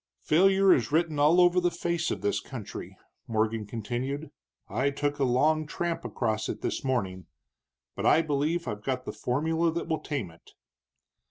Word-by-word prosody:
"Failure 190 Hz, +4 st, +5 dB
is 120 Hz, -1 st, 0 dB
written 160 Hz, -1 st, +1 dB
all 155 Hz, +5 st, +5 dB
over 180 Hz, 0 st, +5 dB
the 175 Hz, -, +3 dB
face 170 Hz, -1 st, -1 dB
of -, -, -3 dB
this 100 Hz, -, 0 dB
country," 120 Hz, -7 st, -8 dB, 0.3 s
Morgan 110 Hz, -1 st, 0 dB
continued; 125 Hz, +7 st, -4 dB, 0.4 s
"I 130 Hz, +8 st, 0 dB
took 145 Hz, +1 st, -2 dB
a -, -, +2 dB
long 150 Hz, +5 st, +2 dB
tramp 170 Hz, +1 st, -3 dB
across 110 Hz, -3 st, -2 dB
it -, -, -4 dB
this -, -, -2 dB
morning. 95 Hz, -9 st, -2 dB, 0.7 s
But -, -, -1 dB
I 165 Hz, -, +5 dB
believe 155 Hz, +3 st, -1 dB
I've 105 Hz, 0 st, -4 dB
got 130 Hz, 0 st, -2 dB
the -, -, -5 dB
formula 160 Hz, +6 st, 0 dB
that 170 Hz, -, -3 dB
will 160 Hz, -1 st, 0 dB
tame 130 Hz, -, -4 dB
it." 80 Hz, -, -20 dB
145 Hz, 170 wpm, -28 LUFS, 120-165 Hz, 0.7 s, Failure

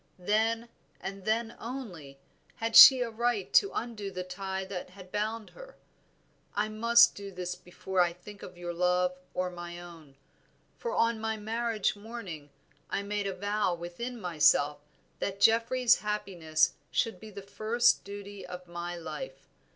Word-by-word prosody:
Then, 225 Hz, +5 st, 0 dB, 0.3 s
and 195 Hz, -1 st, -7 dB
then 225 Hz, +1 st, 0 dB
only, 195 Hz, -, -7 dB, 0.4 s
had 225 Hz, 0 st, -3 dB
she 260 Hz, -2 st, +11 dB
a 235 Hz, -2 st, -1 dB
right 230 Hz, -3 st, -1 dB
to 400 Hz, -, +6 dB
undo 220 Hz, -4 st, -4 dB
the 185 Hz, -1 st, -5 dB
tie 190 Hz, +1 st, -4 dB
that 190 Hz, -2 st, -6 dB
had 185 Hz, 0 st, -14 dB
bound 215 Hz, +1 st, -3 dB
her. -, -, -13 dB, 0.8 s
I 210 Hz, +1 st, 0 dB
must 235 Hz, +2 st, +5 dB
do 200 Hz, -1 st, -8 dB
this 180 Hz, -1 st, -4 dB
before 180 Hz, +1 st, -2 dB
I 175 Hz, -1 st, +3 dB
think 200 Hz, +4 st, -13 dB
of 180 Hz, -, -10 dB
your 175 Hz, 0 st, -5 dB
love 180 Hz, +1 st, +2 dB, 0.2 s
or 180 Hz, 0 st, -1 dB
my 175 Hz, 0 st, -8 dB
own, 165 Hz, -5 st, -13 dB, 0.6 s
for 475 Hz, -, -4 dB
on 230 Hz, -1 st, +2 dB
my 220 Hz, 0 st, -2 dB
marriage 220 Hz, 0 st, -1 dB
morning 205 Hz, -9 st, -8 dB, 0.4 s
I 200 Hz, -, -2 dB
made 205 Hz, 0 st, -2 dB
a 195 Hz, -, -3 dB
vow 205 Hz, -1 st, 0 dB
within 175 Hz, +9 st, -6 dB
myself 150 Hz, -5 st, +3 dB, 0.4 s
that 200 Hz, 0 st, -3 dB
Geoffrey's 230 Hz, +3 st, +4 dB
happiness 175 Hz, -7 st, 0 dB, 0.2 s
should 225 Hz, -, -1 dB
be 220 Hz, -, -10 dB
the 200 Hz, -1 st, -9 dB
first 220 Hz, +4 st, +2 dB
duty 200 Hz, -1 st, -8 dB
of 180 Hz, 0 st, -9 dB
my 175 Hz, 0 st, -5 dB
life. -, -, -8 dB
200 Hz, 155 wpm, -30 LUFS, 180-225 Hz, 0.8 s, she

